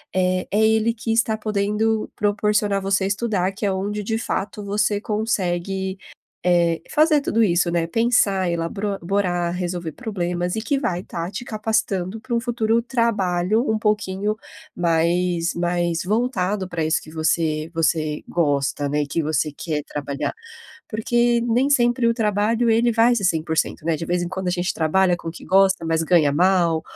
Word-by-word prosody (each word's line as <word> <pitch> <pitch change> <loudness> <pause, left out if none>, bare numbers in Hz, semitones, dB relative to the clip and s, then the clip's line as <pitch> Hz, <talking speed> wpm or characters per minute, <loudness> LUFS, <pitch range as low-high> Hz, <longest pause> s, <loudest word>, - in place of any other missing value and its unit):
eh, 185 0 +1
é 210 - +2
ele 220 +1 +3
que 225 0 -4
está 225 -1 +2
podendo 215 +1 0
proporcionar 210 0 +1
a - - -2
você 195 0 +1
estudar, 200 -2 0
que 205 +2 -4
é 200 - +2
onde 205 +2 -3
de 225 +2 -1
fato 210 -2 -3
você 205 +1 0
consegue, 190 -3 -2 0.5
eh, 170 -2 +2
fazer 305 -1 +4
tudo 230 -5 0
isso, 175 -3 +2
né, 170 -1 0
pensar, 200 -4 +2
elabro 195 +5 -2
borar, 175 -2 0
resolver 175 -2 -3
problemas 180 -5 -3
e 220 - -2
que 280 +4 0
vai 180 -9 -1
estar 170 -1 -5
te 205 +4 -5
capacitando 215 -3 -1
pra 250 -1 -3
um - - +2
futuro 230 -1 0
trabalho 215 -4 +1
um 220 - +2
pouquinho 210 -1 0 0.4
mais 170 +1 +1
mais 175 -1 0
voltado 205 -2 0
pra 170 -3 -3
isso 155 0 +1
que 155 - -13
você 155 -1 0
você 155 -2 0
gosta, 145 -3 0
né, 150 +1 0
e - - -7
que 165 +3 -1
você 155 0 0
quer 150 0 -4
trabalhar. 140 -1 -4 0.6
Porque 235 +2 +2
nem 240 +4 +1
sempre 240 -2 +3
o 230 - +4
trabalho 220 +1 +1
ele 230 +1 +3
vai 230 +2 +4
ser 200 - -1
100%, 160 -2 0
né, 165 - +1
de 165 - -5
vez 175 +1 0
em 175 - -3
quando 190 0 -4
a - - +2
gente 180 +1 -1
trabalha 175 +3 +2
com 165 - -8
o - - -4
que - - -11
gosta, 190 -3 +3
mas 165 0 +1
ganha 165 -3 +3
mal, 170 -1 +2
190 Hz, 175 wpm, -22 LUFS, 170-220 Hz, 0.6 s, fazer